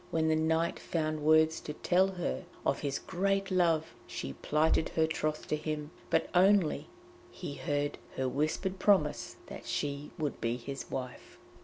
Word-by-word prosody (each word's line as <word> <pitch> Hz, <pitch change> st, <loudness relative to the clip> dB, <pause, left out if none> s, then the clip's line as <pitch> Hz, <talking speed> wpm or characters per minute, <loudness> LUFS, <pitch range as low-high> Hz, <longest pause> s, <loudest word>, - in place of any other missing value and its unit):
When 160 Hz, -1 st, +1 dB
the 160 Hz, -, +4 dB
knight 160 Hz, +1 st, +1 dB
found 155 Hz, -2 st, -1 dB
words 155 Hz, +1 st, +5 dB
to 150 Hz, -, -6 dB
tell 185 Hz, +5 st, +3 dB
her 175 Hz, -, -3 dB, 0.2 s
of -, -, +2 dB
his 140 Hz, -1 st, -1 dB
great 195 Hz, +2 st, 0 dB
love, 165 Hz, -4 st, +2 dB
she 70 Hz, -, -5 dB
plighted 155 Hz, -, +2 dB
her 160 Hz, -, +2 dB
troth 155 Hz, -1 st, -2 dB
to -, -, +2 dB
him, 150 Hz, 0 st, -4 dB, 0.2 s
but 165 Hz, -, +2 dB
only 180 Hz, -5 st, +4 dB, 0.4 s
he 175 Hz, -, -6 dB
heard 145 Hz, 0 st, -1 dB, 0.2 s
her 130 Hz, -, 0 dB
whispered 155 Hz, +8 st, -1 dB
promise 185 Hz, -8 st, +2 dB
that -, -, -9 dB
she 145 Hz, 0 st, -2 dB
would 150 Hz, -4 st, -3 dB
be 115 Hz, +1 st, 0 dB
his 135 Hz, +3 st, -6 dB
wife. 130 Hz, -1 st, -6 dB
155 Hz, 160 wpm, -31 LUFS, 145-170 Hz, 0.4 s, words